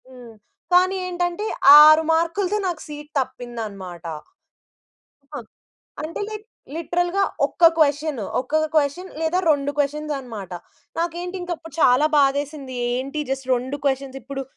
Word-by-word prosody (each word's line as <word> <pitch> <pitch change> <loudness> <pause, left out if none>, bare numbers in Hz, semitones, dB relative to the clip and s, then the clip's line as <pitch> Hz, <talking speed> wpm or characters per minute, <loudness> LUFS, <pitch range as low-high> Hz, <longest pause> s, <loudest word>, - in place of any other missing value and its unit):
హ్మ్. 245 -3 -13 0.4
కానీ 370 +2 +4
ఏంటంటే 355 +2 -2 0.4
6 310 +1 +7
మార్కులతో 345 +5 0
నాకు 345 -3 -4
సీట్ 295 0 -9
తప్పిందన్నమాట. 210 -9 -6 1.3
ఆహ్, 240 - -8 0.6
అంటే 315 +2 -6
లైక్ 425 -1 -8 0.3
లిటరల్‌గా 350 +4 0 0.2
1 335 - +4
క్వషన్ 295 -3 +1 0.2
1 265 +4 -4 0.2
క్వషన్ 310 +5 0
లేదా 325 +2 0
2 285 -1 0
క్వషన్స్ 300 +1 -1
అన్నమాట. 220 -8 -9 0.5
నాకేంటింక 355 +2 -4
అప్పుడు 325 -1 -14
చాలా 255 +3 +5
బాధేసింది. 280 -1 0 0.2
ఏంటి 270 +5 -3
జస్ట్ 270 -1 -3
2 260 +3 -4
క్వషన్స్ 270 -1 -1
ఇప్పుడు 270 +3 -6
295 Hz, 120 wpm, -22 LUFS, 260-340 Hz, 1.3 s, 6